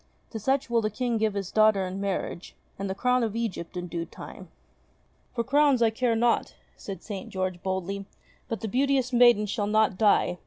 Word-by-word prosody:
To 225 - -5
such 265 +5 0
will 235 -1 +2
the 215 - 0
King 235 +1 -1
give 215 -2 0
his 195 -2 -3
daughter 215 -3 +4
in 185 +2 -5
marriage, 195 -2 -4 0.2
and 195 0 -3
the 190 - -2
crown 250 +4 +2
of 225 -2 -1
Egypt 195 -7 -4
in 175 - -3
due 170 -1 -4
time." - - -11 0.9
"For 235 - 0
crowns 280 -1 +3
I 225 - +4
care 230 +1 0
not," 235 +1 +1 0.2
said 195 -1 -8
St. 200 -3 -6
George 185 -2 -3
boldly, 190 +1 -3 0.4
"but 225 - -4
the 225 - -3
beauteous 260 +2 +1
maiden 240 -3 +6
shall 205 0 -2
not 215 -2 +2
die. 205 -4 +3
215 Hz, 195 wpm, -27 LUFS, 195-240 Hz, 0.9 s, maiden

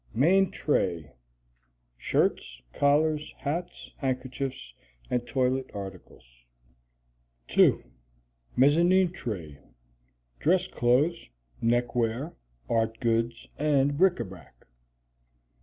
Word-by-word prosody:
Main 185 +9 +4
Tray. 85 - -1 0.8
Shirts, - - -1
collars, 150 +1 +1
hats, 165 +5 -5
handkerchiefs, 130 - -4 0.4
and 120 -1 -1
toilet 130 0 0
articles. 95 -3 -9 1.3
2. - - +4 0.7
Mezzanine 170 +7 +4
Tray. 85 - -6 0.8
Dress 180 +3 +2
clothes, 135 +8 +1 0.3
neckwear, 120 +4 0 0.3
art 115 - 0
goods, 115 -1 -1
and 145 -1 +2
bric 180 +1 +3
a - - 0
brac. 95 -2 -14
130 Hz, 80 wpm, -27 LUFS, 115-150 Hz, 1.3 s, Main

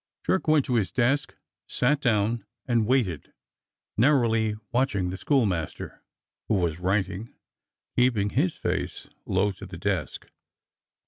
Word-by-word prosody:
Jerk 190 - +1
went 155 -3 +4
to 125 - +1
his 105 -5 0
desk, 130 +3 +1 0.3
sat 140 +3 +1
down 115 -2 +1 0.2
and 115 -4 +2
waited, 115 - 0 0.6
narrowly 115 -4 +3 0.2
watching 110 -8 +1
the - - -4
schoolmaster, 100 - -1 0.5
who 110 - +2
was 85 -3 0
writing, 95 +3 -1 0.6
keeping 115 -5 +2
his 160 +6 +1
face - - -3 0.2
low 100 +2 +2
to 95 - -10
the - - -8
desk. - - -2
115 Hz, 125 wpm, -26 LUFS, 100-130 Hz, 0.6 s, went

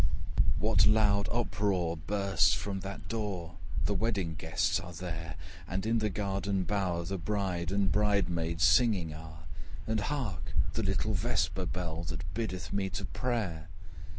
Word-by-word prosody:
What 100 0 +4
loud 105 -2 +4
uproar 100 -7 +1
bursts 95 -1 +2
from 100 -1 -3
that 95 +1 -7
door! 95 -7 -3 0.3
The 105 - +2
wedding 100 -5 0
guests 80 +3 +1
are 90 -1 -8
there: 80 -2 -5 0.3
But 95 +3 -2
in 115 +1 +3
the 110 -1 +1
garden 100 -1 -1
bower 90 -4 0
the 95 +2 -3
bride 90 -3 -1
And 100 -1 +2
bride 105 -2 +3
maids 85 -1 -1
singing 90 -3 +4
are: 80 0 -10 0.4
And 110 0 0
hark 110 - -2 0.2
the - - 0
little 95 +3 0
vesper 95 -3 0
bell, 85 -2 -3
Which 80 -1 -3
biddeth 95 -7 -3
me 100 -1 0
to 85 - -4
prayer! 105 -11 -2
95 Hz, 150 wpm, -31 LUFS, 85-105 Hz, 0.4 s, What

